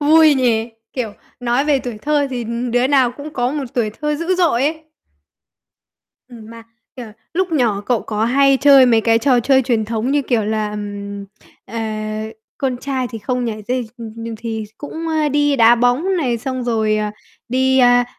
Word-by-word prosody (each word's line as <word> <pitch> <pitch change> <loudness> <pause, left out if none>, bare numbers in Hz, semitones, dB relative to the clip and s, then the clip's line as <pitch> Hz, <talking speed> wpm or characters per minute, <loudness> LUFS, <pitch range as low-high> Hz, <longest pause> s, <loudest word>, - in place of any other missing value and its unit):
vui 310 0 +6
nhỉ? 235 -3 +1 0.2
Kiểu, 235 -5 -3 0.3
nói 245 +3 +1
về 295 -2 +2
tuổi 245 -4 -6
thơ 295 -1 +1
thì, 245 -2 -3
ừm, 235 +2 -3
đứa 245 +2 +2
nào 265 -3 +3
cũng 295 +1 -8
có 245 -2 -1
một 290 -1 -3
tuổi 230 -4 0
thơ 300 +7 -3
dữ 335 +4 -1
dội 335 -9 +2
ấy. 310 +2 -2 1.4
Ừm, 225 -3 -12
mà, 230 0 -11 0.3
kiểu, 245 -2 -7 0.3
lúc 370 0 0
nhỏ 235 -9 +1
cậu 230 +2 0
có 215 0 -2
hay 275 +3 +4
chơi 275 -2 +7
mấy 230 -2 +4
cái 225 0 +3
trò 250 0 +3
chơi 265 +2 +3
truyền 235 -3 0
thống 225 +3 -2
như 290 0 +2
kiểu 235 -5 0
là, 215 0 -1
ừm, 205 -1 -6 0.4
ờ, 230 +3 -6 0.8
con 260 -2 -1
trai 260 0 -3
thì 225 - -6
không 250 +3 -2
nhảy 215 -2 -4
dây, 250 -2 -1
ừm, 225 -2 -7
nhừ 230 0 -6
thì 225 -1 -4
cũng, 325 +3 -6
ơ, 310 -2 +1
đi 290 0 +2
đá 230 -1 +6
bóng 245 +11 +1
này, 250 -8 0
xong 255 +2 -4
rồi, 220 -3 +1
à, 210 0 -2 0.4
đi, 260 +2 +2
a, 245 -1 +5
245 Hz, 195 wpm, -18 LUFS, 225-280 Hz, 1.4 s, chơi